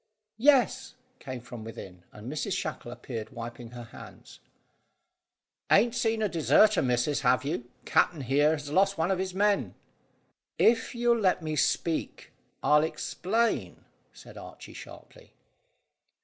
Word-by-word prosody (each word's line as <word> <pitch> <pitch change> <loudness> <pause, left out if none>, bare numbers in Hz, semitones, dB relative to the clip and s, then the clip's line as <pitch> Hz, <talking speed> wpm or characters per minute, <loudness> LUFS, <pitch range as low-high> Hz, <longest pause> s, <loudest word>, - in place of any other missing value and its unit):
"Yes," 270 0 +3 0.2
came 130 -2 -7
from 120 -1 -9
within, 95 -5 -10
and 105 +2 -11
Mrs 155 +8 -3
Shackle 155 -6 -5
appeared 115 -3 -7
wiping 120 0 -8
her 120 0 -9
hands. 115 - -13 1.3
"Ain't 230 +3 +5
seen 225 -3 0
a - - +3
deserter, 195 +4 +4
missus, 125 +3 0
have 125 0 +2
you? 120 -4 -3 0.2
Capt'n 160 -5 +2
here 145 +4 +2
has 145 -2 -5
lost 195 +3 +2
one 165 +3 0
of 190 - 0
his 185 -1 -3
men." 205 +1 +1 0.8
"If 230 +1 +2
you'll 235 0 +2
let 185 -4 +1
me 155 -1 -3
speak, 165 +2 -1 0.3
I'll 150 0 +4
explain," 220 +7 -2 0.3
said - - -13
Archy - - -11
sharply. - - -13
155 Hz, 135 wpm, -28 LUFS, 125-205 Hz, 1.3 s, Ain't